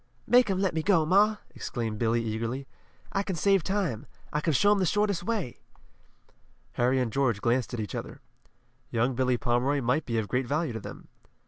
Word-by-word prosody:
"Make 245 Hz, -2 st, +5 dB
'em 190 Hz, -, +1 dB
let 190 Hz, -2 st, +1 dB
me 160 Hz, -, 0 dB
go, 170 Hz, -3 st, +3 dB
ma!" 205 Hz, +6 st, +4 dB, 0.2 s
exclaimed 110 Hz, -3 st, -4 dB
Billy, 115 Hz, 0 st, +1 dB
eagerly. 115 Hz, +5 st, -3 dB, 0.4 s
"I 195 Hz, -, 0 dB
can 195 Hz, -2 st, -3 dB
save 195 Hz, +3 st, +3 dB
time. 185 Hz, -, -2 dB, 0.3 s
I 150 Hz, -, 0 dB
can 160 Hz, -, +1 dB
show 205 Hz, +10 st, +4 dB
'em 205 Hz, -, +3 dB
the 185 Hz, -, +2 dB
shortest 205 Hz, -2 st, +1 dB
way!" 195 Hz, -, -3 dB, 1.1 s
Harry 125 Hz, +2 st, +1 dB
and 120 Hz, -4 st, -1 dB
George 130 Hz, -7 st, +1 dB
glanced 120 Hz, +2 st, 0 dB
at -, -, -5 dB
each 105 Hz, -4 st, -4 dB
other. -, -, -6 dB, 0.7 s
Young 120 Hz, +3 st, +1 dB
Billy 125 Hz, 0 st, +1 dB
Pomeroy 130 Hz, +3 st, +1 dB
might 130 Hz, +4 st, 0 dB
be 115 Hz, -2 st, -1 dB
of 110 Hz, -2 st, -1 dB
great 125 Hz, +4 st, -1 dB
value 150 Hz, -1 st, -1 dB
to 110 Hz, -, -4 dB
them. -, -, -10 dB
135 Hz, 195 wpm, -28 LUFS, 120-190 Hz, 1.1 s, Make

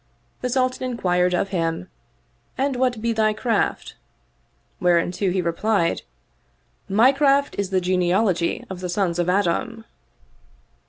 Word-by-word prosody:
The 250 Hz, -, -2 dB
Sultan 255 Hz, 0 st, 0 dB
in 245 Hz, -, -4 dB
quired 180 Hz, -2 st, +1 dB
of 195 Hz, -, -1 dB
him, 165 Hz, -1 st, -2 dB, 0.4 s
" -, -, -41 dB
And 270 Hz, 0 st, 0 dB
what 245 Hz, -3 st, 0 dB
be 230 Hz, 0 st, +1 dB
thy 215 Hz, -1 st, +2 dB
craft? 230 Hz, +2 st, -1 dB, 0.4 s
" -, -, -42 dB
Whereto 175 Hz, +2 st, +2 dB
he 180 Hz, 0 st, 0 dB
re 170 Hz, -, 0 dB
plied, 195 Hz, -1 st, 0 dB, 0.9 s
My 225 Hz, +7 st, +5 dB
craft 280 Hz, 0 st, +2 dB
is 200 Hz, -2 st, -1 dB
the 190 Hz, -1 st, +1 dB
genealogy 180 Hz, 0 st, +1 dB
of 190 Hz, -2 st, -7 dB
the 180 Hz, -1 st, -5 dB
sons 175 Hz, -2 st, -1 dB
of 175 Hz, 0 st, +1 dB
Adam." 205 Hz, +4 st, 0 dB
195 Hz, 150 wpm, -22 LUFS, 180-235 Hz, 0.9 s, My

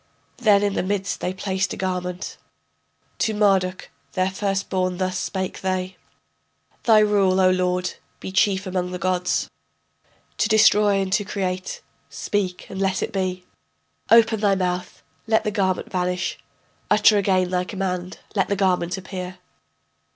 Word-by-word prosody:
Then 210 Hz, -4 st, +4 dB
in 205 Hz, -1 st, +1 dB
the -, -, 0 dB
midst 195 Hz, +1 st, -2 dB
they 180 Hz, -, -2 dB
placed 190 Hz, 0 st, -2 dB
a -, -, -7 dB
garment. 180 Hz, -1 st, -3 dB, 0.8 s
To 220 Hz, -2 st, +1 dB
Marduk 190 Hz, -3 st, +1 dB, 0.2 s
their 185 Hz, 0 st, +1 dB
first 195 Hz, 0 st, -1 dB
born 185 Hz, -1 st, -1 dB
thus 185 Hz, 0 st, -1 dB
spake 190 Hz, 0 st, -3 dB
they: 185 Hz, 0 st, -2 dB, 0.9 s
Thy 225 Hz, -2 st, +6 dB
rule, 200 Hz, -3 st, +3 dB
O 185 Hz, -1 st, +5 dB
lord, 180 Hz, 0 st, 0 dB, 0.3 s
be -, -, -6 dB
chief 190 Hz, +1 st, +2 dB
among 180 Hz, -1 st, -2 dB
the 180 Hz, -, -4 dB
gods, 180 Hz, 0 st, 0 dB, 0.9 s
To 210 Hz, -, +2 dB
destroy 210 Hz, -2 st, +5 dB
and 190 Hz, -1 st, -1 dB
to 205 Hz, -, +2 dB
create 190 Hz, -2 st, -3 dB, 0.3 s
speak 185 Hz, -3 st, -2 dB
and 195 Hz, 0 st, -6 dB
let 195 Hz, -1 st, +1 dB
it -, -, -4 dB
be. 185 Hz, -2 st, -2 dB, 0.6 s
Open 225 Hz, -1 st, +5 dB
thy 200 Hz, -2 st, +3 dB
mouth, 180 Hz, -1 st, -3 dB, 0.2 s
let 220 Hz, -1 st, +3 dB
the 210 Hz, -, -1 dB
garment 190 Hz, -3 st, -1 dB
vanish. 180 Hz, -1 st, -1 dB, 0.5 s
Utter 210 Hz, 0 st, +5 dB
again 185 Hz, -2 st, +1 dB
thy 180 Hz, -1 st, +1 dB
command, 185 Hz, -2 st, -4 dB, 0.2 s
let 195 Hz, -3 st, +1 dB
the 200 Hz, -, 0 dB
garment 185 Hz, -2 st, +1 dB
appear. 185 Hz, -1 st, -6 dB
190 Hz, 150 wpm, -23 LUFS, 185-200 Hz, 0.9 s, Thy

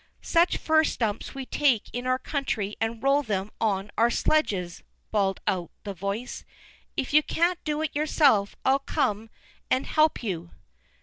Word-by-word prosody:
"Such 340 Hz, +1 st, +3 dB
fir 315 Hz, 0 st, +3 dB
stumps 225 Hz, -7 st, -2 dB
we 270 Hz, -1 st, -5 dB
take 265 Hz, -5 st, +2 dB
in 245 Hz, +1 st, -3 dB
our 255 Hz, 0 st, +2 dB
country 235 Hz, -8 st, -2 dB
and 225 Hz, 0 st, -2 dB
roll 275 Hz, +1 st, +4 dB
them 205 Hz, -5 st, -3 dB
on 205 Hz, -2 st, 0 dB
our 230 Hz, +1 st, +5 dB
sledges," 195 Hz, -, 0 dB, 0.3 s
bawled 195 Hz, -3 st, +1 dB
out 175 Hz, -3 st, -1 dB
the 200 Hz, -, -5 dB
voice. 200 Hz, +6 st, -4 dB, 0.5 s
"If 265 Hz, -, -2 dB
you 305 Hz, -, +7 dB
can't 340 Hz, +3 st, 0 dB
do 305 Hz, 0 st, -1 dB
it 310 Hz, -, -3 dB
yourself, 285 Hz, -9 st, +3 dB
I'll 270 Hz, +1 st, +4 dB
come 225 Hz, -6 st, -1 dB, 0.4 s
and 260 Hz, +1 st, +1 dB
help 310 Hz, -4 st, +2 dB
you." 175 Hz, -6 st, -4 dB
240 Hz, 160 wpm, -26 LUFS, 200-290 Hz, 0.5 s, you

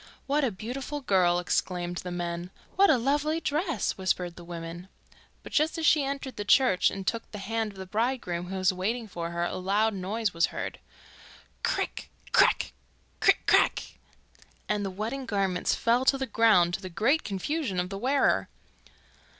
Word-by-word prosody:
'What 285 Hz, +2 st, +1 dB
a 265 Hz, -, +3 dB
beautiful 255 Hz, +8 st, -5 dB
girl!' 185 Hz, -7 st, +3 dB
exclaimed 175 Hz, 0 st, -1 dB
the 180 Hz, -, -5 dB
men. 175 Hz, 0 st, -4 dB, 0.3 s
'What 395 Hz, +2 st, +5 dB
a -, -, +5 dB
lovely 290 Hz, +6 st, +1 dB
dress!' 320 Hz, -, -1 dB
whispered 180 Hz, -2 st, -1 dB
the 175 Hz, -, -11 dB
women. 170 Hz, +1 st, -7 dB, 0.5 s
But -, -, -10 dB
just 310 Hz, +2 st, +1 dB
as 325 Hz, -, -1 dB
she 300 Hz, -1 st, +5 dB
entered 275 Hz, -1 st, -4 dB
the 205 Hz, -, -2 dB
church 205 Hz, -3 st, +4 dB
and 195 Hz, -1 st, -6 dB
took 230 Hz, +2 st, -2 dB
the 210 Hz, -, -8 dB
hand 220 Hz, +2 st, -2 dB
of -, -, -16 dB
the 190 Hz, -, -6 dB
bridegroom, 210 Hz, -4 st, -2 dB
who 190 Hz, -, -5 dB
was 185 Hz, 0 st, +2 dB
waiting 220 Hz, +6 st, -2 dB
for 170 Hz, -4 st, -5 dB
her, 170 Hz, 0 st, -2 dB
a 175 Hz, -, -2 dB
loud 205 Hz, +4 st, +1 dB
noise 200 Hz, +2 st, -2 dB
was 170 Hz, 0 st, +3 dB
heard. -, -, -5 dB, 0.8 s
'Crick! -, -, -2 dB, 0.2 s
crack! -, -, +4 dB, 0.5 s
Crick! -, -, +4 dB
crack!' -, -, +2 dB, 0.7 s
and 210 Hz, -1 st, 0 dB
the 195 Hz, -, -2 dB
wedding 225 Hz, +8 st, -4 dB
garments 195 Hz, -4 st, 0 dB
fell 235 Hz, +2 st, +2 dB
to 275 Hz, -, +4 dB
the 265 Hz, -, -2 dB
ground, 215 Hz, -9 st, +4 dB
to 175 Hz, -, -2 dB
the 185 Hz, -, -6 dB
great 250 Hz, -, +2 dB
confusion 205 Hz, -, -2 dB
of 180 Hz, 0 st, -1 dB
the 195 Hz, -, -4 dB
wearer. 270 Hz, +5 st, +2 dB
205 Hz, 175 wpm, -28 LUFS, 180-265 Hz, 0.8 s, What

